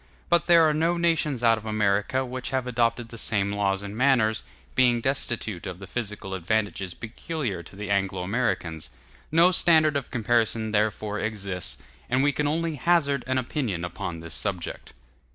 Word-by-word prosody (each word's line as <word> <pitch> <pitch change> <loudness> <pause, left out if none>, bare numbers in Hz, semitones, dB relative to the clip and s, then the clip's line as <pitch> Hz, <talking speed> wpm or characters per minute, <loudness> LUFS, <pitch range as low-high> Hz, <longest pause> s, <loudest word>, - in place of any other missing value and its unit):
But 170 -2 +3
there 170 -2 +7
are 155 - +2
no 165 +3 +1
nations 160 -7 +1
out 115 -1 +4
of 110 - -14
America 105 +4 +1
which 130 0 -5
have 130 -1 -1
adopted 120 -1 0
the 115 - -8
same 100 -3 +1
laws 100 -1 0
and 100 +1 -6
manners, 120 -4 +3 0.3
being 125 -2 +4
destitute 115 -7 -2
of 90 -2 -6
the 95 - -9
physical 105 -2 -5
advantages 95 0 -1
peculiar 115 - -4
to 85 - -13
the 105 0 -5
Anglo 95 -2 0
Americans. 90 -7 -1 0.4
No 170 +3 +6
standard 160 -4 +5
of 140 -3 -2
comparison 115 -1 0
therefore 105 0 0
exists, 100 -4 -2 0.3
and 130 +2 +2
we 145 - +4
can 145 +1 -1
only 160 +1 -1
hazard 140 -4 +2
an 130 0 0
opinion 120 - -2
upon 85 -2 -5
this 85 0 -6
subject. 95 -5 -3
115 Hz, 170 wpm, -26 LUFS, 100-135 Hz, 0.4 s, there